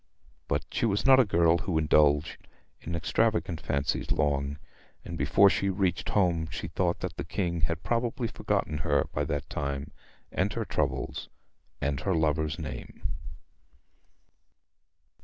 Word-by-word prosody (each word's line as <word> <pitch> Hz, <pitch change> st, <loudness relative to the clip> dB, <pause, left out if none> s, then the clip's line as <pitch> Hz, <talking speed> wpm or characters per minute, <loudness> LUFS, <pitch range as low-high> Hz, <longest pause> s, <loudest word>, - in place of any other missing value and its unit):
But -, -, -1 dB
she 115 Hz, -, +1 dB
was 100 Hz, -1 st, 0 dB
not 135 Hz, -1 st, +8 dB
a 130 Hz, -, +6 dB
girl 85 Hz, -3 st, +3 dB
who 85 Hz, 0 st, -1 dB
indulged 75 Hz, -1 st, +3 dB, 0.3 s
in 85 Hz, -, -5 dB
extravagant 90 Hz, 0 st, 0 dB
fancies 70 Hz, 0 st, -1 dB
long, 70 Hz, -1 st, 0 dB, 0.5 s
and 85 Hz, -, -5 dB
before 80 Hz, +7 st, +5 dB
she 100 Hz, 0 st, +2 dB
reached 95 Hz, -2 st, 0 dB
home 85 Hz, -5 st, +2 dB
she 85 Hz, -1 st, -5 dB
thought 85 Hz, +1 st, 0 dB
that -, -, -4 dB
the -, -, -3 dB
King 85 Hz, -3 st, -2 dB
had 85 Hz, 0 st, -1 dB
probably 120 Hz, +3 st, 0 dB
forgotten 75 Hz, -7 st, -1 dB
her 70 Hz, 0 st, +2 dB
by 75 Hz, -, 0 dB
that 70 Hz, -1 st, -3 dB
time, 70 Hz, -1 st, -3 dB, 0.4 s
and -, -, 0 dB
her -, -, -2 dB
troubles, -, -, -2 dB, 0.5 s
and 70 Hz, -1 st, 0 dB
her 95 Hz, -3 st, 0 dB
lover's 80 Hz, -1 st, +1 dB
name. 75 Hz, -5 st, -6 dB
80 Hz, 140 wpm, -28 LUFS, 75-95 Hz, 0.5 s, not